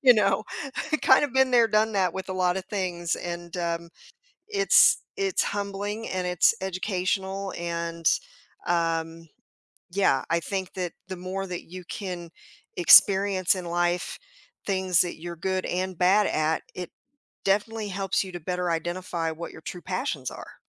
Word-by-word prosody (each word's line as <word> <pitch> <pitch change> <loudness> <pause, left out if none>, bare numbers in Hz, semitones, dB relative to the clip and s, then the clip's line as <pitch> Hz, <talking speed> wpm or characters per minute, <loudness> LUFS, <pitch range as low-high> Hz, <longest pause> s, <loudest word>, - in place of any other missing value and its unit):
You 250 -2 +8
know, 200 -1 +2 0.5
I - - +5
kinda 275 +2 +5
been 265 0 +3
there 235 -2 +5
done 215 +1 +2
that 190 -2 +1
with 190 0 -5
a - - -1
lotta 185 0 +1
things 180 -4 -2
and, 175 0 -6
um, 170 -1 -2 0.6
it's 400 -2 +5 0.2
it's 390 -1 +1
humbling, 205 +2 -3
and 185 -1 -2
it's 180 -1 +4
educational, 190 +1 -2
and, 170 -1 -4 0.6
um, 165 -1 -1 0.6
yeah, 170 -8 +2
I 170 - +2
think 190 +2 -4
that 180 -2 -3
the 185 -1 -6
more 190 +2 -4
that 180 -1 -5
you 180 +1 -10
can 175 -3 -6 0.5
experience 190 +1 +6
in 180 -1 -5
life 175 +1 -1 0.5
things 190 -3 +2
that 175 -3 -3
you're 175 0 -6
good 185 +2 -2
and 185 0 -2
bad 195 +4 +4
at 155 +1 +1
it 180 -2 -6 0.5
definitely 210 +2 +1
helps 195 0 0
you 190 - -8
to 175 - -5
better 180 +1 -2
identify 170 0 -2
what 165 +2 -7
your - - -12
true 175 +1 -7
passions 160 -8 -3
are. - - -11
185 Hz, 155 wpm, -26 LUFS, 170-195 Hz, 0.6 s, You